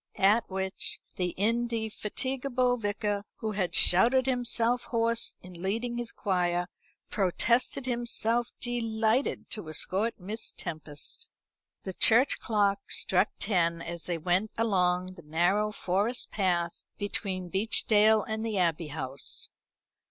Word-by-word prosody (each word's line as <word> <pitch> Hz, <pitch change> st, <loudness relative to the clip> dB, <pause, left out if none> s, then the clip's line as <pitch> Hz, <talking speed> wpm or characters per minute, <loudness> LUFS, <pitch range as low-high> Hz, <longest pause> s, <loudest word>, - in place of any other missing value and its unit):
At 210 Hz, +4 st, +3 dB
which 190 Hz, 0 st, -2 dB, 0.2 s
the 180 Hz, -2 st, -2 dB
indefatigable 240 Hz, +3 st, -1 dB
Vicar, 205 Hz, -1 st, -2 dB
who 220 Hz, -2 st, -3 dB
had 195 Hz, -4 st, -1 dB
shouted 245 Hz, +8 st, +5 dB
himself 245 Hz, -1 st, +1 dB
hoarse 230 Hz, 0 st, +1 dB
in 180 Hz, -1 st, -11 dB
leading 230 Hz, +5 st, -2 dB
his 240 Hz, -1 st, -4 dB
choir, 180 Hz, -3 st, 0 dB, 0.5 s
protested 235 Hz, +7 st, +1 dB
himself 235 Hz, -1 st, 0 dB
delighted 230 Hz, 0 st, 0 dB
to 210 Hz, -8 st, -5 dB
escort 195 Hz, +9 st, -1 dB
Miss 210 Hz, +5 st, -4 dB
Tempest. 155 Hz, -3 st, -7 dB, 0.5 s
The 190 Hz, -, -5 dB
church 235 Hz, +8 st, +5 dB
clock 200 Hz, -2 st, 0 dB
struck 190 Hz, +2 st, +1 dB
ten 170 Hz, -5 st, +1 dB
as 170 Hz, 0 st, -7 dB
they 175 Hz, -2 st, -2 dB
went 180 Hz, +6 st, +1 dB
along 185 Hz, -4 st, +1 dB
the 175 Hz, -, -13 dB
narrow 175 Hz, +7 st, +1 dB
forest 210 Hz, +5 st, -1 dB
path 175 Hz, -4 st, 0 dB
between 190 Hz, -3 st, -3 dB
Beechdale 215 Hz, +1 st, +4 dB
and 220 Hz, 0 st, -3 dB
the 220 Hz, -3 st, -2 dB
Abbey 170 Hz, -3 st, +1 dB
House. 140 Hz, -2 st, -3 dB
205 Hz, 120 wpm, -29 LUFS, 180-230 Hz, 0.5 s, shouted